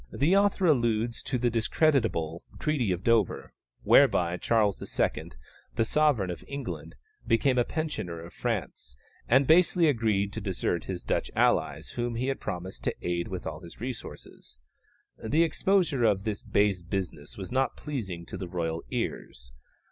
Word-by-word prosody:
The 160 +8 +2
author 200 -1 +3
alludes 115 -6 +2
to 135 -3 -2
the 120 0 +1
discreditable 115 - +1 0.2
Treaty 140 -10 0
of 90 +1 -2
Dover, 115 -5 +1 0.3
whereby 85 0 +5
Charles 105 -3 +1
II., - - -2 0.4
the 115 - +2
Sovereign 130 -9 +2
of 85 - -7
England, 140 0 -6 0.3
became 125 +2 +3
a - - +4
pensioner 135 - -4
of 85 +1 -10
France, 65 0 -3 0.3
and 130 +3 +5
basely 170 +3 +5
agreed 110 -7 +1
to 110 - -4
desert 90 -3 -1
his 90 -2 -5
Dutch - - -1
allies, - - +1
whom 120 -1 -3
he 130 +3 -1
had 135 - -2
promised 90 -9 -6
to - - 0
aid 85 0 -1
with 90 -2 -6
all - - -5
his 85 -2 -13
resources. 120 - -8 0.7
The 150 +9 +3
exposure 170 -4 +1
of 100 -4 +3
this 105 -2 -3
base 100 -3 +1
business 85 -4 -5
was 95 +3 -7
not 130 +1 0
pleasing 100 - -5
to - - -7
the 95 - -5
royal 85 -2 -2
ears. - - -4
110 Hz, 155 wpm, -28 LUFS, 90-135 Hz, 0.7 s, whereby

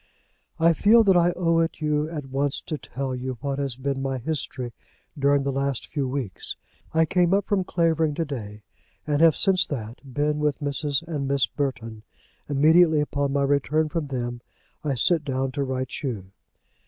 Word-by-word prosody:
I 165 +1 +5
feel 220 +7 +5
that 195 -3 +4
I 175 0 +4
owe 165 -2 +1
it 165 -1 -1
you 150 0 0
at 150 -4 -5
once 140 +1 0
to 155 - -4
tell 135 -2 -5
you 130 0 -4
what 140 -1 -2
has 135 -3 -1
been 135 +1 -3
my 135 -1 -2
history 130 -3 -4 0.4
during 140 -1 +2
the 140 - -1
last 135 -1 -1
few 140 -4 -2
weeks. 125 -8 -4 0.4
I 160 0 +3
came 180 +3 +2
up 200 -1 0
from 200 -3 +1
Clavering 165 -4 +1
to 165 - -1
day, 105 -7 -7 0.4
and 150 0 0
have 165 -2 +6
since 190 -2 +4
that 115 -4 -5
been 150 +3 0
with 150 -2 +1
Mrs. 145 +1 0
and 145 -5 -3
Miss 140 -2 +3
Burton. 120 -6 -4 0.5
Immediately 155 +2 +5
on 140 -1 0
my 140 0 +1
return 145 +3 +1
from 155 -1 -3
them 120 -3 -4 0.4
I 145 -3 0
sit 160 +6 +3
down 135 -1 -2
to 140 +1 -2
write 130 -1 -3
you. 105 -9 -4
145 Hz, 180 wpm, -25 LUFS, 135-160 Hz, 0.5 s, have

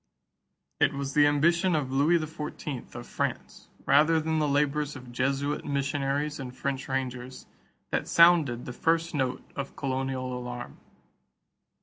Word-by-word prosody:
It - - +3
was 140 0 -4
the 145 -1 +6
ambition 170 +5 +3
of 140 -4 -1
Louis 145 +6 +4
XIV 150 -5 -6
of 120 0 -7
France, - - -4 0.2
rather 155 +4 +5
than 160 0 0
the 150 - +1
labors 145 +1 +1
of 125 -2 -10
Jesuit 135 +3 -1
missionaries 140 +1 -1
and 130 -1 -7
French 135 -1 -3
rangers, 130 -1 -4 0.5
that - - -1
sounded 165 -8 +5
the 125 - -6
first 165 +5 +1
note 130 -3 -1
of 140 -1 -5
colonial 130 -1 -2
alarm. 125 0 -7
140 Hz, 135 wpm, -28 LUFS, 130-150 Hz, 0.5 s, the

